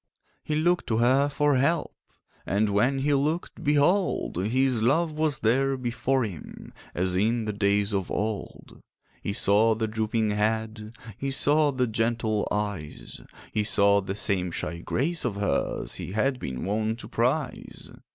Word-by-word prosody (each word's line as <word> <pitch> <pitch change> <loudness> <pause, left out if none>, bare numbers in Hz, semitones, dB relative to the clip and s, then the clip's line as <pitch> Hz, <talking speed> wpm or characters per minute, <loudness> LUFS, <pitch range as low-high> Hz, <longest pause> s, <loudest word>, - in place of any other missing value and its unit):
He 150 - -2
looked 175 +3 +1
to 110 - +1
her 130 +5 +3
for 145 -1 +2
help, 150 +6 +1 0.5
And 105 +2 +1
when 120 +7 +2
he 145 +2 +1
looked—behold! 155 +4 +1
His 130 0 +1
love 155 +8 +2
was 155 -5 +1
there 135 +4 +2
before 130 +1 0
him 95 -8 -8 0.2
As 90 +1 0
in 110 +4 +1
the 105 - -2
days 100 0 +1
of 95 -2 -1
old. 105 -1 -4 0.4
He - - -3
saw 105 +2 +3
the 110 0 -1
drooping 110 0 -1
head, 110 +1 -2 0.2
He 135 - -2
saw 145 +2 +3
the 130 -2 0
gentle 110 -2 0
eyes; 100 -8 -4 0.3
He 105 - +1
saw 100 -1 +3
the 95 0 -4
same 95 -3 -1
shy 85 0 -4
grace 160 - -1
of 120 -5 -1
hers 100 0 -1
He 90 - -5
had 130 +5 0
been 65 - -5
wont 110 +3 -1
to - - -9
prize. - - -2
110 Hz, 150 wpm, -26 LUFS, 105-135 Hz, 0.5 s, her